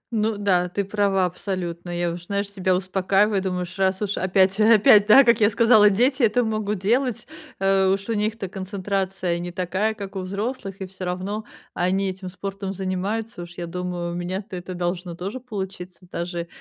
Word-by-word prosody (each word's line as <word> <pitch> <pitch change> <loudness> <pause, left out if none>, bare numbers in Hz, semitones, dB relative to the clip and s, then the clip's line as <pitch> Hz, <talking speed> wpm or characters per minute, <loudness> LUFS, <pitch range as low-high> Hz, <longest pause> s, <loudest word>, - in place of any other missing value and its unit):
Ну 215 0 +1
да, 185 -3 +2
ты 200 +3 -1
права 200 -2 +1
абсолютно. 180 -1 -4
Я 175 0 -1
уж, 175 +1 -8
знаешь, 200 0 -1
себя 190 -2 0
успокаиваю, 195 +2 +1
думаю, 180 -1 -2
уж 180 +1 -9
раз 190 0 +2
уж 205 0 -1
опять 190 +2 +2
опять, 215 -1 +6
да, 245 +6 +9
как 235 -2 +4
я 205 - +6
сказала, 220 -1 +6
дети 255 +7 +2
это 235 +1 +3
могут 215 -2 -1
делать, 235 +5 0 0.3
э, 195 0 +3
уж 195 +1 0
у - - +1
них-то 210 -1 -1
концентрация 190 -1 -2
не 175 0 -5
такая, 190 +4 -1
как 200 -2 -8
у - - -2
взрослых, 195 +1 -4
и - - -2
всё 185 0 -8
равно 190 +5 -3 0.3
они 190 +2 0
этим 185 0 -8
спортом 195 +1 -5
занимаются. 195 +3 -3
Уж 175 0 -9
я 175 - -4
думаю, 175 0 -4
у - - -5
меня-то 185 +3 -4
это 180 +1 -6
должно 175 0 -3
тоже 195 +8 -5
получиться, 190 -6 -6
даже 170 0 -4
195 Hz, 185 wpm, -23 LUFS, 180-210 Hz, 0.3 s, да